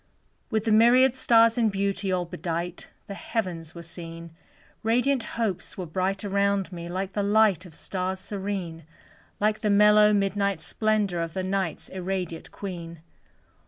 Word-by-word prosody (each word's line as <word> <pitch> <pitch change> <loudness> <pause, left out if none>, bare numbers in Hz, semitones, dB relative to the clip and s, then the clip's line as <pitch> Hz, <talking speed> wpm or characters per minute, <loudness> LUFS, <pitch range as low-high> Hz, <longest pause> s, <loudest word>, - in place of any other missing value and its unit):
With 220 -3 0
the 225 - 0
myriad 240 +4 +6
stars 230 -2 +4
in 225 -2 +3
beauty 195 -1 -1
All 180 -1 0
bedight, 170 +1 -4 0.2
the 200 - -7
heavens 180 -5 -4
were 170 - -8
seen, 165 0 -9 0.5
Radiant 250 +4 +2 0.2
hopes 215 -6 -2
were 185 - -4
bright 190 +5 -2
around 200 -1 +1
me, 170 -1 -7
Like 190 +2 -3
the 205 - 0
light 200 -3 +3
of 160 - -15
stars 185 +1 -3
serene; 190 -4 -4 0.6
Like 215 +1 +1
the 215 - +1
mellow 210 +1 +6
midnight 200 -2 +1
splendor 210 -1 0
Of 165 +1 -4
the 190 - -1
Night's 190 -3 -2
irradiate 185 -3 -4
queen. 170 -4 -7
195 Hz, 150 wpm, -26 LUFS, 175-210 Hz, 0.6 s, myriad